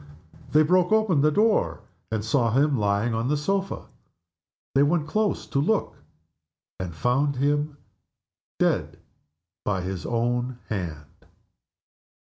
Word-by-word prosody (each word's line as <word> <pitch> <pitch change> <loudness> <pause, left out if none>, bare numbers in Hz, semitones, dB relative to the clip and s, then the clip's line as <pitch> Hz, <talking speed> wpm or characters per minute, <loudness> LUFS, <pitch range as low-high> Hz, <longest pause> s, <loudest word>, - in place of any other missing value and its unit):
They 155 +1 +5
broke 180 +3 +3
open 215 -9 +3
the 150 - +5
door, 210 +7 +2 0.3
and 110 -1 -2
saw 115 -1 +2
him 140 +2 +3
lying 105 +1 +1
on 115 +2 -1
the 150 +2 +1
sofa. 195 +6 -2 0.9
They 135 - +4
went 150 +2 +2
close 210 +5 0
to 140 - -1
look 205 +9 0 0.8
and 90 -3 -5
found 135 - +1
him 145 +2 0 0.8
dead - - 0 0.7
by 95 -3 -1
his 95 0 -4
own 120 +1 -1
hand. 80 -8 -6
140 Hz, 125 wpm, -25 LUFS, 110-155 Hz, 0.9 s, They